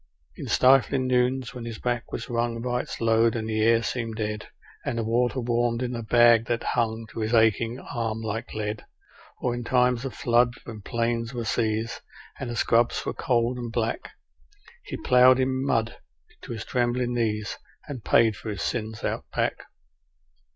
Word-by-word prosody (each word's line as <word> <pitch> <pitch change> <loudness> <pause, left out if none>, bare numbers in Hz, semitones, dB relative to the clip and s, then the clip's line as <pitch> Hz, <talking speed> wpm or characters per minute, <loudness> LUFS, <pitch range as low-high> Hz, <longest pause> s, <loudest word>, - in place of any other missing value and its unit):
In - - -7
stifling 130 0 +4
noons 125 0 +1
when 125 -2 -7
his 115 -2 -6
back 120 0 -2
was - - -5
wrung 120 -1 -1
by 125 +1 -1
its - - -8
load, 115 0 +3
and 110 -1 -3
the 110 -1 -1
air 115 +1 +4
seemed 115 -3 -3
dead, 105 -1 -3 0.4
And 115 - -2
the 115 - 0
water 120 +3 +1
warmed 120 0 0
in 125 - -2
the 120 -1 -4
bag 115 0 +5
that 120 -1 -1
hung 115 -2 0
to - - -7
his 110 +2 0
aching 115 +1 +3
arm 115 -4 -3
like 115 +1 -4
lead, 105 0 -3 0.6
Or 125 - 0
in 120 0 -4
times 125 0 +2
of 135 - -5
flood, 120 -1 +2
when 110 -3 -9
plains 115 +2 -2
were 120 -1 -3
seas, 110 +2 -1 0.4
and 130 - -4
the 120 - -4
scrubs 115 +1 +2
were - - -2
cold 120 0 0
and 120 -1 -5
black, 115 -1 -2 0.7
He - - -6
ploughed 125 0 +5
in 130 0 0
mud 115 -4 0 0.5
to - - -8
his 110 -1 -6
trembling 120 0 0
knees, 110 -3 -1 0.3
and 130 -6 -7
paid 110 -2 +4
for 110 - -7
his 100 -2 -4
sins 110 -2 -3
Out - - -2
Back. - - -2
115 Hz, 180 wpm, -26 LUFS, 115-125 Hz, 0.7 s, bag